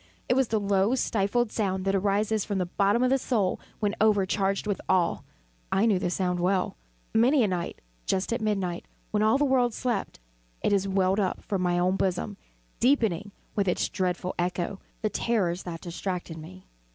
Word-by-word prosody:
it -, -, +3 dB
was 265 Hz, -1 st, +3 dB
the 220 Hz, -1 st, +1 dB
low 200 Hz, +3 st, +2 dB
stifled 225 Hz, 0 st, +1 dB
sound 190 Hz, -3 st, -1 dB
that 195 Hz, -, +2 dB
arises 205 Hz, +2 st, +1 dB
from 200 Hz, -, -2 dB
the 185 Hz, -, 0 dB
bottom 200 Hz, +6 st, +2 dB
of 255 Hz, -, +3 dB
the 270 Hz, -, +3 dB
soul 210 Hz, -8 st, 0 dB, 0.2 s
when 205 Hz, -1 st, 0 dB
overcharged 200 Hz, -2 st, +2 dB
with 205 Hz, -2 st, -2 dB
awe. 180 Hz, -3 st, +2 dB, 0.5 s
I 195 Hz, +3 st, +3 dB
knew 205 Hz, -5 st, +3 dB
the 180 Hz, -, -1 dB
sound 180 Hz, -1 st, 0 dB
well. 185 Hz, +1 st, +1 dB, 0.4 s
Many 250 Hz, +4 st, +4 dB
a -, -, +3 dB
night, 180 Hz, -3 st, -3 dB, 0.3 s
just 190 Hz, +4 st, 0 dB
at 235 Hz, -, -2 dB
midnight, 195 Hz, -5 st, -1 dB, 0.2 s
when 210 Hz, -, +1 dB
all 220 Hz, +4 st, +4 dB
the 290 Hz, -, +2 dB
world 250 Hz, -4 st, +2 dB
slept, 235 Hz, -, -2 dB, 0.4 s
it -, -, +2 dB
has 200 Hz, -1 st, +2 dB
welled 190 Hz, +1 st, +2 dB
up 190 Hz, -3 st, -1 dB
from 195 Hz, -3 st, -2 dB
my 175 Hz, -1 st, +1 dB
own 180 Hz, +2 st, +2 dB
bosom, 180 Hz, -, -1 dB, 0.4 s
deepening, 220 Hz, -, +2 dB, 0.2 s
with 200 Hz, -2 st, +1 dB
its 180 Hz, -, +1 dB
dreadful 180 Hz, -1 st, -1 dB
echo, 180 Hz, +2 st, -1 dB, 0.2 s
the 215 Hz, -, +2 dB
terrors 185 Hz, -7 st, 0 dB
that 165 Hz, -2 st, -6 dB
distracted 180 Hz, -1 st, -4 dB
me. 95 Hz, -12 st, -11 dB
195 Hz, 185 wpm, -27 LUFS, 185-220 Hz, 0.5 s, Many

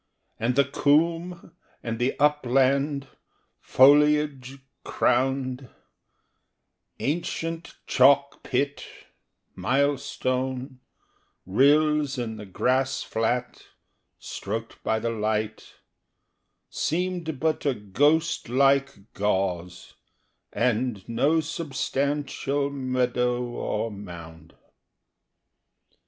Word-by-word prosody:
And 120 Hz, +3 st, 0 dB
the 140 Hz, 0 st, +4 dB
coomb 165 Hz, +5 st, +1 dB, 0.3 s
and 115 Hz, -1 st, -4 dB
the 125 Hz, +2 st, 0 dB
upland 140 Hz, 0 st, +2 dB, 0.5 s
Foliage 145 Hz, -1 st, +4 dB, 0.3 s
crowned, 130 Hz, 0 st, 0 dB, 1.3 s
Ancient 165 Hz, +2 st, -3 dB
chalk 140 Hz, +2 st, +4 dB
pit, 140 Hz, +2 st, -1 dB, 0.7 s
milestone, 130 Hz, +2 st, -1 dB, 0.7 s
rills 145 Hz, +6 st, +3 dB
in 115 Hz, -3 st, -4 dB
the 105 Hz, -1 st, -9 dB
grass 130 Hz, +7 st, 0 dB
flat 120 Hz, +2 st, -2 dB, 0.6 s
Stroked 115 Hz, 0 st, -6 dB
by 110 Hz, -, +1 dB
the 115 Hz, +1 st, -2 dB
light, 110 Hz, -1 st, -3 dB, 0.9 s
Seemed 170 Hz, -3 st, -2 dB
but 160 Hz, +1 st, 0 dB
a 135 Hz, -, +1 dB
ghost 145 Hz, -, +1 dB
like 135 Hz, -4 st, +1 dB
gauze, 90 Hz, -3 st, -2 dB, 0.6 s
and 120 Hz, -4 st, -1 dB
no 140 Hz, +8 st, +2 dB
substantial 140 Hz, -1 st, -2 dB
Meadow 125 Hz, -2 st, 0 dB
or 120 Hz, -1 st, -3 dB
mound. 85 Hz, -5 st, -11 dB
130 Hz, 75 wpm, -25 LUFS, 115-145 Hz, 1.3 s, the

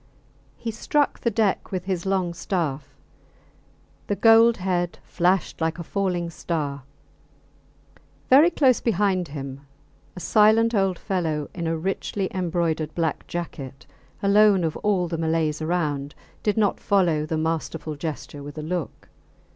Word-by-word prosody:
He 230 Hz, -, -4 dB
struck 285 Hz, +6 st, 0 dB
the 235 Hz, -, +1 dB
deck 215 Hz, -3 st, 0 dB
with 185 Hz, -2 st, -3 dB
his 185 Hz, -1 st, -2 dB
long 185 Hz, -3 st, 0 dB
staff; 150 Hz, -6 st, -3 dB, 1.1 s
the 205 Hz, -, 0 dB
gold 225 Hz, +2 st, +6 dB
head 180 Hz, -2 st, -1 dB
flashed 180 Hz, 0 st, 0 dB
like 160 Hz, +1 st, 0 dB
a 170 Hz, -, -5 dB
falling 175 Hz, -2 st, -2 dB
star; 150 Hz, -4 st, -3 dB, 1.5 s
very 290 Hz, +6 st, +7 dB
close 270 Hz, -7 st, +3 dB
behind 195 Hz, -5 st, +1 dB
him 140 Hz, -2 st, -7 dB, 0.5 s
a -, -, -7 dB
silent 220 Hz, +4 st, +4 dB
old 195 Hz, -4 st, +1 dB
fellow 160 Hz, -7 st, -2 dB
in 170 Hz, -2 st, -3 dB
a 165 Hz, 0 st, 0 dB
richly 190 Hz, +2 st, -2 dB
embroidered 170 Hz, -4 st, -1 dB
black 165 Hz, -3 st, -2 dB
jacket 140 Hz, -6 st, -6 dB, 0.4 s
alone 200 Hz, -1 st, +5 dB
of 160 Hz, -2 st, -1 dB
all 195 Hz, -4 st, +1 dB
the 165 Hz, -1 st, -4 dB
Malays 160 Hz, -1 st, 0 dB
around 150 Hz, -4 st, -1 dB, 0.3 s
did 210 Hz, +1 st, 0 dB
not 210 Hz, -2 st, +2 dB
follow 170 Hz, -6 st, +2 dB
the 160 Hz, -, -1 dB
masterful 160 Hz, -1 st, -2 dB
gesture 145 Hz, -1 st, -6 dB
with 145 Hz, +2 st, -9 dB
a 155 Hz, -, -4 dB
look. 170 Hz, -1 st, -4 dB
175 Hz, 140 wpm, -24 LUFS, 155-200 Hz, 1.5 s, very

